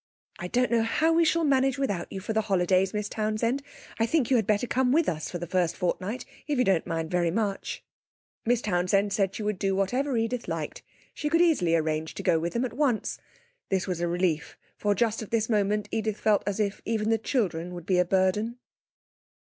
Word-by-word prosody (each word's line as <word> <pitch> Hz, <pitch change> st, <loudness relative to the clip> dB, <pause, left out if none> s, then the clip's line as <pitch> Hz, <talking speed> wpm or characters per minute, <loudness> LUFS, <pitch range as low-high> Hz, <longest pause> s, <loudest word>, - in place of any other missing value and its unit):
'I 180 Hz, -, -4 dB
don't 250 Hz, +6 st, +1 dB
know 235 Hz, -1 st, +4 dB
how 300 Hz, +9 st, +2 dB
we 335 Hz, +1 st, +4 dB
shall 330 Hz, +1 st, +2 dB
manage 270 Hz, -2 st, +2 dB
without 200 Hz, -11 st, -2 dB
you 195 Hz, -, -4 dB
for 210 Hz, +3 st, -4 dB
the 220 Hz, -, +2 dB
holidays, 190 Hz, -2 st, +2 dB
Miss 210 Hz, -1 st, -2 dB
Townsend. 220 Hz, +5 st, -1 dB, 0.4 s
I 225 Hz, -, +3 dB
think 270 Hz, -2 st, +1 dB
you -, -, +6 dB
had 220 Hz, -4 st, 0 dB
better 210 Hz, +2 st, +2 dB
come 250 Hz, +1 st, +1 dB
with 320 Hz, +4 st, +3 dB
us 155 Hz, -3 st, -2 dB
for 175 Hz, -, -4 dB
the 175 Hz, -, -5 dB
first 175 Hz, -1 st, 0 dB
fortnight, 190 Hz, +5 st, -2 dB, 0.2 s
if 295 Hz, -2 st, 0 dB
you 250 Hz, -, +4 dB
don't 190 Hz, -6 st, +1 dB
mind 165 Hz, -1 st, -3 dB, 0.2 s
much.' 205 Hz, -3 st, -2 dB, 0.6 s
Miss 240 Hz, 0 st, +1 dB
Townsend 195 Hz, +1 st, +1 dB
said 195 Hz, -2 st, 0 dB
she 215 Hz, -, -4 dB
would 210 Hz, -3 st, -2 dB
do 195 Hz, -1 st, +1 dB
whatever 250 Hz, +7 st, 0 dB
Edith 230 Hz, +2 st, -1 dB
liked. -, -, -4 dB, 0.3 s
She 295 Hz, -, -2 dB
could 330 Hz, +2 st, +3 dB
easily 290 Hz, -, +3 dB
arrange 155 Hz, -1 st, -1 dB
to -, -, -5 dB
go 165 Hz, -, +3 dB
with 170 Hz, +2 st, -3 dB
them 235 Hz, +2 st, 0 dB
at 245 Hz, -, -5 dB
once. 255 Hz, -4 st, 0 dB, 0.5 s
This 190 Hz, -2 st, 0 dB
was 180 Hz, -2 st, -3 dB
a 175 Hz, -, +1 dB
relief, 170 Hz, -3 st, -1 dB, 0.2 s
for 205 Hz, -1 st, 0 dB
just 225 Hz, -1 st, +1 dB
at 220 Hz, -, -7 dB
this 225 Hz, -1 st, 0 dB
moment 210 Hz, -1 st, +1 dB
Edith 220 Hz, -1 st, -1 dB
felt 215 Hz, -2 st, +3 dB
as 205 Hz, +1 st, -1 dB
if 205 Hz, -1 st, -1 dB
even 220 Hz, -1 st, 0 dB
the 225 Hz, -, +2 dB
children 180 Hz, -, -1 dB
would 175 Hz, -2 st, -8 dB
be 180 Hz, -1 st, +2 dB
a -, -, +5 dB
burden. 195 Hz, +6 st, +1 dB
210 Hz, 215 wpm, -27 LUFS, 185-240 Hz, 0.6 s, you